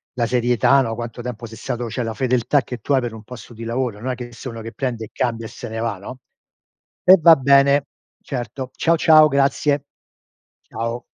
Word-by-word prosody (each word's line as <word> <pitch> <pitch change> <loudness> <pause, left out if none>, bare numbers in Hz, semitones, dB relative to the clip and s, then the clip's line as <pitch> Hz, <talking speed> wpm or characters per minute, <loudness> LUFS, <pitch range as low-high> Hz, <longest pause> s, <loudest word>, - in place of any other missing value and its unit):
la 120 -2 0
serietà, 125 +2 +3
no, 115 -3 -2
quanto 120 +1 -7
tempo 120 -2 -6
sei 115 0 -12
stato 120 -1 -4
cioè 120 +2 -3
la 115 -1 -3
fedeltà 125 +3 +1
che 125 - -7
tu 140 - -2
hai 130 - +3
per 120 -2 -4
un 110 - -11
posto 120 0 -11
di 115 - -9
lavoro, 115 -2 -3
non 130 +3 -3
è - - -3
che 120 -1 -8
sono 120 +1 -8
uno - - -8
che 115 - -7
prende 120 -5 -4
e - - -16
cambia 115 -2 -2
e - - -13
se 120 - -9
ne 110 0 -5
va, 115 -4 -2
no? 125 +7 -10 0.8
Eh 185 +1 +8
va 165 0 +8
bene, 140 +1 +4 0.4
certo. 125 0 -5
Ciao 165 0 +2
ciao, 155 -1 +6
grazie. 140 0 +1 0.8
Ciao. 115 +2 -5
125 Hz, 215 wpm, -20 LUFS, 115-135 Hz, 0.8 s, Eh